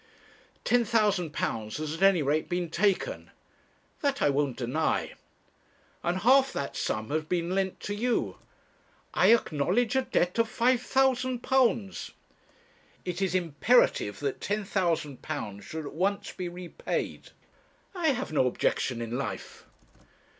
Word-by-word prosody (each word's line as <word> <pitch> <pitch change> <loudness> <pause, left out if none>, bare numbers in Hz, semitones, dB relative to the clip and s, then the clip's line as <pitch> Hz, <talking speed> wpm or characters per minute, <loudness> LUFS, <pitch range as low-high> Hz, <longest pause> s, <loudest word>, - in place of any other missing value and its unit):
'Ten 245 0 +3
thousand 210 -7 +1
pounds 110 -8 -3
has 155 0 -3
at 165 - -7
any 195 -5 +5
rate 150 +3 0
been 175 -2 -2
taken.' 205 - 0 0.7
'That 280 -1 0
I 145 - +3
won't 140 -2 0
deny.' 130 +6 -1 0.9
'And 180 +2 0
half 265 +4 +5
that 140 - -4
sum 110 +4 -2
has 155 +1 0
been 175 +2 -1
lent 190 -1 -1
to 205 - -3
you.' 235 +4 -1 0.8
'I - - +4
acknowledge 230 - 0
a 265 - +4
debt 180 -5 0
of 230 -1 +3
£5,000.' 250 -2 +1 0.9
'It 180 +1 -3
is 190 -2 0
imperative 170 - +2
that 140 -2 -2
£10,000 170 - -2
should 155 +9 -6
at - - -7
once 200 +5 -1
be 180 -2 -5
repaid.' 175 0 -4 0.6
'I 350 -4 -1
have 265 - 0
no 130 -4 +3
objection 120 -1 0
in 115 +1 -4
life.' 130 -6 -6
180 Hz, 130 wpm, -28 LUFS, 150-235 Hz, 0.9 s, any